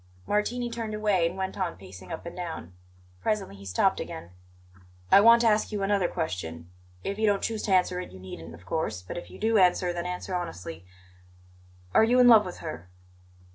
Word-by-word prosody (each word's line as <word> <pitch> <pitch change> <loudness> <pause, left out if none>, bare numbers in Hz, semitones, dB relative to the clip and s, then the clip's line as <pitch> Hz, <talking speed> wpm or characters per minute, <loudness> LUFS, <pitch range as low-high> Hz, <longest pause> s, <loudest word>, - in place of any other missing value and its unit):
Martini 240 +4 0
turned 230 -2 -4
away 205 -5 +2
and 175 +3 -6
went 190 0 -3
on 180 -3 -2
pacing 95 -1 -12
up - - -6
and 170 - -7
down. 165 - -6 0.5
Presently 210 - -1
he 100 0 -11
stopped 90 - +2
again. 85 - -7 0.8
"I 200 - +9
want 230 +2 +7
to 235 - +4
ask 215 0 +2
you 205 -2 -2
another 195 -2 +2
question. 90 - -4 0.3
If 200 +2 -3
you 220 - +3
don't 200 -1 +2
choose 220 -2 -1
to 205 - -2
answer 180 0 +2
it, 180 - -7
you 95 - -12
needn't, 85 -3 -9
of 85 +1 -17
course; 95 - -2
but 90 - -7
if 175 - -7
you - - -11
do 220 0 +2
answer, 180 -1 +3
then 175 0 -3
answer 180 +1 -5
honestly. 90 - -5 1.1
Are - - +6
you 245 +3 +4
in 250 - +7
love 220 -4 +7
with 180 - -7
her?" 155 - -7
180 Hz, 205 wpm, -27 LUFS, -, 1.1 s, I